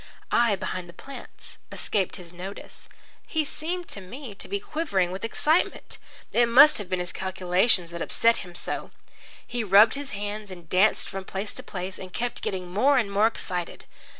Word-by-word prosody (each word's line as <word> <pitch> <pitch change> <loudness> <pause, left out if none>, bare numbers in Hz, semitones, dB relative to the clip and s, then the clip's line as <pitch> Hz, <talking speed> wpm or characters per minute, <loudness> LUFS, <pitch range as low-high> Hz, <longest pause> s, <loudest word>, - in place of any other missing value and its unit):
I, 235 -4 +4
behind 185 -2 -4
the - - -11
plants, 275 +10 -9
escaped 195 -4 -1
his 175 -3 -10
notice. 190 +3 -8 0.4
He 315 -2 0
seemed 345 +5 -4
to 200 - -6
me 240 +5 -8
to 200 - -6
be 200 - -2
quivering 200 - 0
with 190 +3 -6
excitement. 310 +8 +1 0.3
It 240 0 +4
must 280 +5 +8
have 200 -3 -6
been 185 - 0
his 180 0 -4
calculations 185 0 +1
that 170 0 -6
upset 230 0 +3
him 175 -2 -8
so. - - -3 0.6
He 240 -1 -2
rubbed 210 +2 +7
his 280 0 -5
hands 205 0 -4
and 175 -3 -10
danced 185 +6 +3
from 195 0 -5
place 195 +2 -5
to - - -7
place, 185 0 -6
and 185 -1 -8
kept 240 +5 -3
getting 185 -2 -3
more 255 +10 +3
and 220 -5 +1
more 205 +2 +4
excited. 180 -6 -4
200 Hz, 180 wpm, -26 LUFS, 185-235 Hz, 0.6 s, must